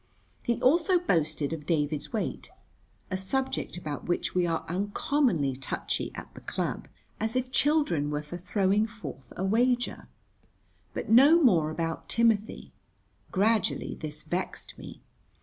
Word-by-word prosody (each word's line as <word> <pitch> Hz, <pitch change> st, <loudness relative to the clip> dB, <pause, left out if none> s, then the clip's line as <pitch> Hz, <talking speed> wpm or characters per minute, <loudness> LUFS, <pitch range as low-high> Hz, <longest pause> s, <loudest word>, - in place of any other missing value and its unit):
He 235 Hz, -1 st, 0 dB
also 335 Hz, +7 st, +4 dB
boasted 160 Hz, -, 0 dB
of 150 Hz, -2 st, -7 dB
David's 150 Hz, -3 st, 0 dB
weight 220 Hz, -, -3 dB, 0.6 s
(a 185 Hz, -, 0 dB
subject 260 Hz, +3 st, -2 dB
about 150 Hz, -5 st, -5 dB
which 175 Hz, -, -1 dB
we 180 Hz, -1 st, +2 dB
are 165 Hz, -1 st, -1 dB
uncommonly 200 Hz, -, +1 dB
touchy 135 Hz, +1 st, -3 dB
at -, -, -9 dB
the -, -, -11 dB
club), -, -, -3 dB, 0.3 s
as 220 Hz, +2 st, -1 dB
if 255 Hz, 0 st, -1 dB
children 280 Hz, -, +2 dB
were 150 Hz, 0 st, -2 dB
for 150 Hz, +4 st, -7 dB
throwing 195 Hz, +3 st, +1 dB
forth 150 Hz, -, -9 dB
for -, -, -15 dB
a 185 Hz, -, -2 dB
wager. 245 Hz, +4 st, +1 dB, 0.9 s
But -, -, -4 dB
no 275 Hz, +9 st, +8 dB
more 165 Hz, -, +4 dB
about 165 Hz, 0 st, -3 dB
Timothy. 225 Hz, -2 st, +1 dB, 0.6 s
Gradually 210 Hz, +1 st, +1 dB
this 155 Hz, 0 st, -7 dB
vexed 175 Hz, +4 st, -4 dB
me. -, -, -11 dB
190 Hz, 140 wpm, -28 LUFS, 155-235 Hz, 0.9 s, no